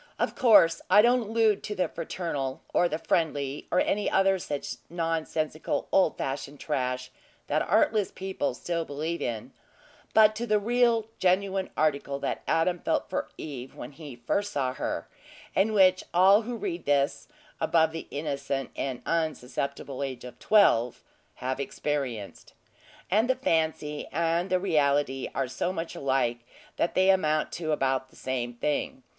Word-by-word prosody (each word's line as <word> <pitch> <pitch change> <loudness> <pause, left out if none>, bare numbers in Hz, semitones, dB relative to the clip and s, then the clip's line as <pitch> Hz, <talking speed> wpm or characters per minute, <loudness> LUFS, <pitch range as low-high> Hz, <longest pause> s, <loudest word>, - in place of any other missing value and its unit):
Of - - 0
course, 185 -9 +5
I 205 +3 +7
don't 240 -1 +3
allude 225 -2 +3
to 210 - -5
the 180 -3 +1
fraternal 160 -5 -4
or 175 - +3
the 155 - -1
friendly, 145 -4 -1
or 180 - +2
any 205 +1 +1
other 195 0 +3
such 145 -4 -4
nonsensical 160 -2 -2
old 190 - +3
fashioned 135 +1 -4
trash 130 -3 -2 0.3
that 150 +2 0
artless 215 0 +2
people 190 -9 -3
still 170 +3 -2
believe 160 +3 -4
in, 115 -3 -4 0.6
but 215 -1 +6
to 235 +1 -3
the 215 -1 +3
real 235 +1 +2
genuine 190 +1 +1
article 140 -2 0
that - - -3
Adam 170 +2 +2
felt - - -1
for - - -2
Eve 135 -4 -7
when 120 - -8
he 145 -2 -10
first 200 +13 -1
saw 130 -3 -1
her, - - -3 0.5
and 200 +3 +3
which 185 -2 +5
all 195 +4 +6
who 240 +2 -5
read 190 -6 -4
this 140 0 +1 0.3
above 160 -1 +3
the 165 0 -7
innocent 140 -2 -3
and 125 -2 -4
unsusceptible 140 -4 -2
age 130 -3 -4
of 125 - -10
twelve 125 - +3 0.3
have 130 +2 -3
experienced. 135 -7 -4 0.6
And 220 +6 +3
the 260 - +4
fancy 160 - -1
and 170 +3 0
the 185 - +2
reality 145 -6 +1
are - - 0
so 130 +8 -2
much 165 -2 -4
alike, 130 -3 0 0.4
that 170 - 0
they 190 +1 +5
amount 155 -5 +1
to 160 -2 -3
about 130 -2 0
the - - -22
same 120 -2 -3
thing. 135 0 -2
160 Hz, 155 wpm, -27 LUFS, 140-190 Hz, 0.6 s, I